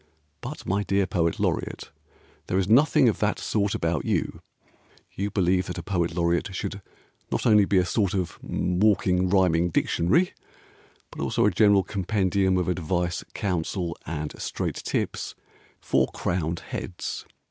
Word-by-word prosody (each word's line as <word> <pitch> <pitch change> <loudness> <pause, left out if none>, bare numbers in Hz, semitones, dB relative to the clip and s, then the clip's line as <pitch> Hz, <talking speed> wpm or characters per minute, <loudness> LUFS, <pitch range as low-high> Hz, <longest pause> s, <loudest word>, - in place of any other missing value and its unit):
But - - -7
my 100 +2 0
dear 100 -1 +1
Poet 85 -3 0
Laureate, - - -2 0.6
There 95 - 0
is 95 -1 +1
nothing 140 +4 +5
of 110 - +1
that 105 0 +1
sort 100 -2 0
about 80 -3 -1
you. - - -1 0.7
You 100 +2 -3
believe 95 -1 +1
that 90 - -5
a 90 - -5
Poet 85 -2 -1
Laureate, 85 +2 0
Should 100 +1 -4 0.5
not - - -1
only 105 -3 +6
be 95 - +2
a 90 - +4
sort 100 +1 0
of 90 -3 -3
walking 90 -1 +1
rhyming 90 -3 +3
dictionary, 90 - +2 0.8
But - - -7
also - - +1
a 105 - +4
general 100 +1 +4
compendium 95 -1 +1
of 90 - 0
advice, 90 -1 -1
counsel, 90 -2 -2
and 75 -1 -4
straight - - -3
tips - - -3 0.5
For - - +2
crowned 85 -2 -2
heads. 90 - -5
95 Hz, 145 wpm, -26 LUFS, 85-100 Hz, 0.8 s, only